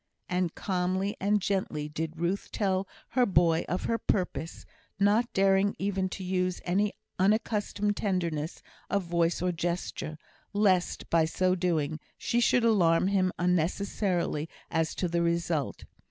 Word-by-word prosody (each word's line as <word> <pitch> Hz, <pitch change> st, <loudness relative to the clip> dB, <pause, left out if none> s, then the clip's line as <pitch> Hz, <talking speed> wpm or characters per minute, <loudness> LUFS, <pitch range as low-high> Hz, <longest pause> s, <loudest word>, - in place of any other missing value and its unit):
And 180 Hz, -2 st, -1 dB
calmly 190 Hz, +1 st, -1 dB
and 205 Hz, +2 st, +2 dB
gently 185 Hz, -6 st, -1 dB
did 160 Hz, +1 st, -4 dB
Ruth 175 Hz, +4 st, -1 dB
tell 195 Hz, -2 st, 0 dB, 0.2 s
her 250 Hz, +1 st, +3 dB
boy 170 Hz, -6 st, +3 dB
of 180 Hz, -, -1 dB
her 230 Hz, 0 st, 0 dB
purpose; 180 Hz, -3 st, -2 dB, 0.3 s
not 210 Hz, +4 st, +3 dB
daring 195 Hz, +1 st, +3 dB
even 190 Hz, -1 st, -1 dB
to 190 Hz, -, -6 dB
use 185 Hz, -1 st, 0 dB
any 200 Hz, +4 st, +1 dB, 0.3 s
unaccustomed 205 Hz, 0 st, +1 dB
tenderness 170 Hz, -5 st, -2 dB, 0.3 s
of 200 Hz, -1 st, +1 dB
voice 170 Hz, 0 st, 0 dB
or 180 Hz, -, +2 dB
gesture, 170 Hz, -2 st, -3 dB, 0.4 s
lest, 195 Hz, -4 st, +2 dB
by 165 Hz, -1 st, +4 dB
so 185 Hz, +3 st, +1 dB
doing, 160 Hz, -4 st, 0 dB, 0.2 s
she 235 Hz, -, 0 dB
should 240 Hz, 0 st, +3 dB
alarm 185 Hz, -5 st, +4 dB
him 185 Hz, -2 st, +2 dB
unnecessarily 175 Hz, -2 st, 0 dB, 0.2 s
as 160 Hz, 0 st, 0 dB
to 180 Hz, -, -1 dB
the 170 Hz, 0 st, 0 dB
result. 170 Hz, -3 st, -1 dB
185 Hz, 140 wpm, -29 LUFS, 170-200 Hz, 0.4 s, by